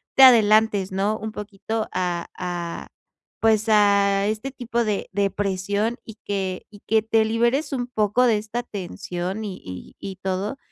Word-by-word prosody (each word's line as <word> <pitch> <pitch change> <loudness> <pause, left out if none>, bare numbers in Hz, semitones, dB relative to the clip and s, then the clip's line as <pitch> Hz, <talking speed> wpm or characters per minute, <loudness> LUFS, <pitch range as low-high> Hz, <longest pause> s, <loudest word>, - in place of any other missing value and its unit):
te 270 - +8
adelantes, 215 -5 +6
¿no?, 200 +3 0
un 220 0 -5
poquito 210 +2 -4
a 175 -2 -1
a, 175 -2 -4 0.5
pues, 220 0 +2
a 200 -2 +4
este 220 +5 -2
tipo 235 -2 -2
de 210 -3 -2
de 200 +1 +1
presión 205 +4 -1
y 220 - -10
que 190 -2 -3
y 205 - -13
que 220 -1 +3
te 220 0 +3
liberes 235 +7 +1
un 245 -2 -1
poco 220 0 +1
de 225 -3 +4
esta 220 +3 -4
tensión 190 0 -5
y 190 -3 -6
y 90 -1 -9
y 195 -1 -6
todo, 190 +6 -2
210 Hz, 160 wpm, -23 LUFS, 195-220 Hz, 0.5 s, te